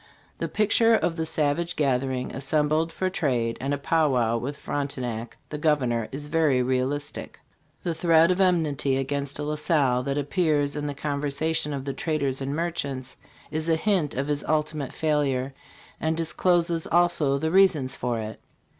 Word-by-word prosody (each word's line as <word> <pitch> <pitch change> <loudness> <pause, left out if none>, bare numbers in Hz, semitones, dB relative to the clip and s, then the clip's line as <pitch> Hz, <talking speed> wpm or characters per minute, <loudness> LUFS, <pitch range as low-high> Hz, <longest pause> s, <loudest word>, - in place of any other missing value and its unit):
The - - -1
picture 225 +2 +3
of 170 - 0
the 160 -1 -2
savage 160 +3 0
gathering 130 -2 0
assembled 150 +4 +1
for 185 - -2
trade 125 -10 -1
and 135 +1 -2
a 145 - +1
pow 155 +2 +2
wow 120 -3 +1
with 135 +5 -3
Fronte 140 -1 -3
nac, 120 -2 -5
the 150 - -5
governor, 125 -7 +1
is 145 +2 -5
very 150 -4 +2
realistic. 130 +3 -2 0.4
The 170 - -1
thread 165 +1 +4
of 185 +1 +1
enmity 155 -7 +2
against 140 +1 -2
La 150 +1 -2
Salle 145 -5 +2
that 140 +2 -2
appears 145 -1 +1
in 150 0 -3
the 145 - -4
conversations 145 +1 -1
of 135 -1 -5
the 140 - -2
traders 140 -5 -1
and 135 +2 -2
merchants 145 -6 -3 0.4
is 155 +2 -2
a 165 - +4
hint 175 -3 0
of 135 +2 -1
his 145 -1 -1
ultimate 150 -3 -1
failure, 140 -4 0 0.5
and 160 0 0
discloses 170 0 +1
also 165 -5 +2
the 160 +3 -1
reasons 165 -9 +4
for 120 -3 -2
it. 110 0 -6
145 Hz, 165 wpm, -25 LUFS, 135-160 Hz, 0.5 s, thread